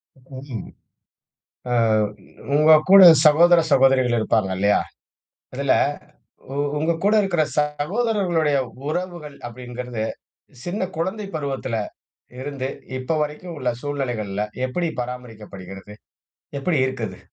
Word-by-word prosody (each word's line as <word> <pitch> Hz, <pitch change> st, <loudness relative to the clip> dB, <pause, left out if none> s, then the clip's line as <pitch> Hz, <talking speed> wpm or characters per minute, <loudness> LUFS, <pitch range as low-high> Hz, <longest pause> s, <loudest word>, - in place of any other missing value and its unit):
ம். 130 Hz, -2 st, -9 dB, 1.0 s
ஆ -, -, 0 dB, 0.8 s
உங்க 155 Hz, +2 st, +6 dB, 0.2 s
கூட 195 Hz, 0 st, +10 dB, 0.2 s
சகோதர, 170 Hz, +3 st, +6 dB
சகோதரிகள் 130 Hz, -2 st, +4 dB
இருப்பாங்க 110 Hz, -3 st, +1 dB
இல்லையா. 100 Hz, +1 st, +3 dB, 0.7 s
அதில -, -, +1 dB, 0.8 s
உ -, -, -5 dB, 0.2 s
உங்க 160 Hz, +3 st, +1 dB
கூட 205 Hz, +2 st, +4 dB
இருக்குற 175 Hz, -5 st, +1 dB, 0.2 s
சகோதரர்களுடைய 165 Hz, 0 st, 0 dB, 0.3 s
உறவுகள் 170 Hz, -3 st, -4 dB
அப்டிங்குறது, 125 Hz, -1 st, -6 dB, 0.6 s
சின்ன 185 Hz, +1 st, -2 dB
குழந்தை 190 Hz, +6 st, -3 dB
பருவத்துல 135 Hz, -5 st, -3 dB, 0.7 s
இருந்து, 135 Hz, -1 st, -4 dB, 0.3 s
இப்ப 140 Hz, +5 st, -1 dB
வரைக்கும் 155 Hz, +4 st, -7 dB
உள்ள 125 Hz, -2 st, 0 dB
சூழ்நிலைகள்ல, 120 Hz, -8 st, -3 dB, 0.2 s
எப்டி 165 Hz, +7 st, -2 dB
பராமரிக்கப்படுகிறது? 105 Hz, -5 st, -9 dB, 0.6 s
எப்டி 155 Hz, +2 st, 0 dB
இருக்குது? 130 Hz, 0 st, -5 dB
140 Hz, 95 wpm, -22 LUFS, 125-170 Hz, 1.0 s, கூட